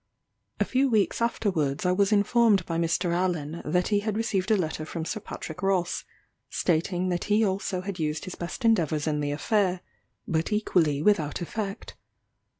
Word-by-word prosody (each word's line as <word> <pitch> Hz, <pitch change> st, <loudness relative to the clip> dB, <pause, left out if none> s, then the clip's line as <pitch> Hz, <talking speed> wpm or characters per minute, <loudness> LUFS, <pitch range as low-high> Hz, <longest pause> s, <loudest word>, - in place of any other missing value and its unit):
A -, -, +3 dB
few 265 Hz, +1 st, +2 dB
weeks 220 Hz, -1 st, +1 dB
afterwards 180 Hz, -11 st, 0 dB
I 180 Hz, -, +3 dB
was 200 Hz, +2 st, +2 dB
informed 210 Hz, -2 st, +4 dB
by 165 Hz, -1 st, -2 dB
Mr. 170 Hz, +1 st, +1 dB
Allen, 170 Hz, -3 st, -1 dB
that 180 Hz, +3 st, 0 dB
he 205 Hz, -1 st, +3 dB
had 210 Hz, 0 st, -2 dB
received 215 Hz, -4 st, 0 dB
a 215 Hz, -, +4 dB
letter 155 Hz, -3 st, -2 dB
from 160 Hz, +1 st, -5 dB
Sir 215 Hz, -, -3 dB
Patrick 180 Hz, -4 st, -8 dB
Ross, 190 Hz, -3 st, 0 dB, 0.4 s
stating 180 Hz, +2 st, 0 dB
that 175 Hz, -1 st, -1 dB
he 215 Hz, +1 st, +3 dB
also 190 Hz, -1 st, -1 dB
had 190 Hz, -1 st, -5 dB
used 155 Hz, +2 st, -2 dB
his 185 Hz, -, -6 dB
best 175 Hz, +8 st, -5 dB
endeavours 160 Hz, -9 st, +2 dB
in 150 Hz, -1 st, 0 dB
the 145 Hz, -1 st, -1 dB
affair, 185 Hz, +4 st, +1 dB, 0.5 s
but 160 Hz, +2 st, -1 dB
equally 165 Hz, -9 st, +1 dB
without 160 Hz, -8 st, +2 dB
effect. 195 Hz, +3 st, -5 dB
185 Hz, 170 wpm, -27 LUFS, 165-205 Hz, 0.5 s, informed